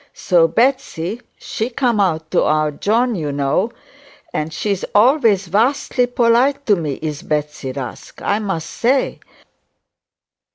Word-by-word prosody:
So 170 -3 +3
Betsey, 235 - 0 0.2
she 245 -2 -4
come 240 -3 0
out 160 -5 0
to - - +3
our 155 0 +1
John, 230 - +1
you 155 -7 -3
know, 140 +10 0 0.6
and 155 +1 -2
she's 200 +3 -2
always 225 -4 +4
vastly 245 +6 +1
polite 245 +4 +2
to 210 - +4
me, 155 -6 -3
is 155 -1 -3
Betsey 150 -5 -3
Rusk, 130 -3 -8
I 205 - 0
must 195 -7 -3
say. 260 +3 0
200 Hz, 130 wpm, -19 LUFS, 155-245 Hz, 0.6 s, always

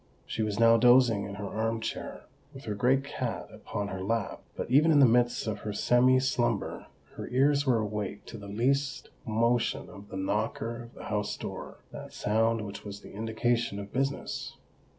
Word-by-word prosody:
She - - -3
was 105 -1 -1
now 115 0 +7
dozing 120 -3 +5
in 100 - -6
her 105 +1 -5
arm 110 +2 -1
chair, 110 - -5 0.3
with 135 - -9
her 105 - -3
great 125 +6 +2
cat 140 - -4
upon 100 -1 -4
her 95 -1 -5
lap; 110 +1 -2
but - - -5
even 150 +5 +6
in 150 - +5
the 140 - +8
midst 120 0 +3
of 110 -2 -2
her 105 -1 -4
semi 125 +4 +4
slumber, 130 -2 -1 0.3
her - - -5
ears 140 +2 +2
were 125 -3 +4
awake 105 -2 -3
to 115 - -9
the 100 - -9
least 130 +4 0 0.2
motion 115 +2 +1
of 100 +1 -12
the 95 - -6
knocker 110 +4 -2
of 115 - -17
the - - -10
house 105 -1 -2
door—that - - -8
sound 110 +1 +1
which 100 - -8
was 100 0 -8
the - - -12
indication 115 +1 0
of 100 0 -7
business! 135 +2 -2
115 Hz, 185 wpm, -29 LUFS, 105-125 Hz, 0.3 s, the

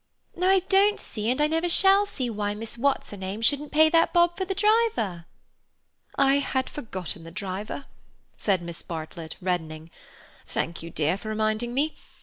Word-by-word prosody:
No, 360 +1 0
I 385 -1 +5
don't 395 +3 +3
see 215 0 -4
and 255 - 0
I 300 - +4
never 325 +3 0
shall 390 +3 +5
see 260 -10 -3
why 210 -2 -2
Miss 220 +2 -5
What's 275 +3 0
her 205 - -7
name 190 +4 -5
shouldn't 285 +4 +1
pay 315 +1 +6
that 330 0 +3
bob 345 -1 +4
for 380 - -2
the 385 +1 -3
driver." 415 - +1 0.9
"I 275 0 +4
had 260 -2 -2
forgotten 185 - -5
the 165 - -9
driver," 200 - -5 0.5
said 190 -4 0
Miss 170 -1 -7
Bartlett, 160 -1 -7
reddening. 165 -3 -3 0.6
"Thank 165 - -3
you, 165 - -7
dear, 160 +3 0
for 215 - -7
reminding 215 +2 -1
me. 300 +3 0
230 Hz, 175 wpm, -26 LUFS, -, 0.9 s, pay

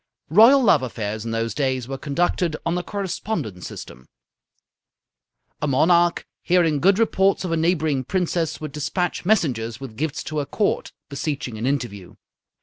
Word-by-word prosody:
Royal 235 - +7
love 175 - +5
affairs 110 -3 -4
in - - -3
those 115 0 -2
days 130 -4 -1
were 135 - -4
conducted 160 +3 0
on 165 - +1
the 180 - -1
correspondence 190 - -4
system. 65 +1 -10 1.5
A 150 - 0
monarch, 170 +5 +3 0.2
hearing 170 -4 +2
good 190 +5 +4
reports 195 -4 +2
of 175 - -3
a - - +2
neighbouring 160 -4 +1
princess, 170 0 -1
would 155 -2 -6
despatch 175 +5 -2
messengers 125 - +1
with 135 -5 -8
gifts 155 0 -2
to 155 -1 -3
her 145 - -2
Court, 205 +8 -1 0.2
beseeching 140 -4 -4
an 120 - -1
interview. 120 -9 -3
155 Hz, 150 wpm, -22 LUFS, 130-180 Hz, 1.5 s, Royal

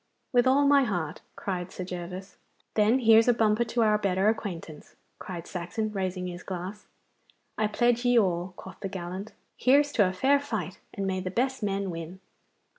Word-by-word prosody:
'With 245 +1 +4
all 280 +2 +4
my 280 -1 +6
heart,' 175 - -2
cried 185 -2 -4
Sir 185 - -5
Gervas. 180 +2 -7 0.4
'Then 215 +3 +4
here's 225 0 +6
a 245 - +5
bumper 220 0 +3
to 235 0 +1
our 210 -1 +3
better 195 0 +2
acquaintance,' 175 -8 -5 0.2
cried 175 -2 -7
Saxon, 195 +5 -3
raising 185 -2 -2
his 175 0 -6
glass. 190 +3 -6 0.7
'I 215 - +3
pledge 240 +2 +2
ye 245 -1 +4
all,' 180 -3 +1
quoth 190 - -11
the 195 - -4
gallant. 185 +3 -6 0.2
'Here's 285 +3 +4
to 205 -8 +3
a - - -3
fair 270 +9 +3
fight, 215 - -4
and 195 - -4
may 190 -1 -1
the 185 0 -3
best 260 +7 -1
men 200 -2 -1
win. 165 +2 -7
200 Hz, 180 wpm, -28 LUFS, 180-230 Hz, 0.7 s, my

